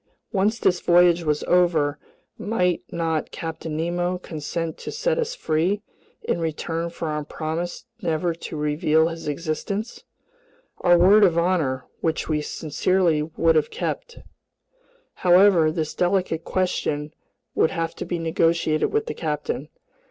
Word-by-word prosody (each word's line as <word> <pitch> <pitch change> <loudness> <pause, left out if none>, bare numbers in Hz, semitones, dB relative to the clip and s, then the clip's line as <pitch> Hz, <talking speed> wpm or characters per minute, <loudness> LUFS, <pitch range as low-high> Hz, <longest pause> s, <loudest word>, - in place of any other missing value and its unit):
Once 210 +2 +1
this 180 -5 +2
voyage 175 0 +5
was 150 -2 0
over, 160 -5 +2 0.4
might 180 -5 0
not 165 -2 -1
Captain 160 -1 -5
Nemo 175 +2 -1
consent 165 -1 -4
to - - -6
set - - 0
us 475 +1 -2
free 185 - 0 0.4
in - - -1
return 165 +1 -2
for 170 -1 -5
our 150 0 -2
promise 165 +7 -4 0.2
never 165 +1 0
to 165 -1 -7
reveal 150 +2 +2
his 165 -2 -7
existence? 170 +8 -3 0.8
Our 175 0 +5
word 200 +5 +6
of 175 -4 +4
honor, 165 -7 +1
which 160 -1 -1
we 150 -1 0
sincerely 160 +2 +1
would 165 +1 +1
have 155 -1 +2
kept. 475 - -4 1.0
However, 180 -3 +6
this 155 -2 -3
delicate 180 -3 0
question 155 -5 -1 0.4
would - - +3
have 165 -2 -2
to - - -4
be 175 - -2
negotiated 165 -1 +1
with 440 +1 0
the - - -4
captain. 150 -2 -3
165 Hz, 135 wpm, -23 LUFS, 155-180 Hz, 1.0 s, word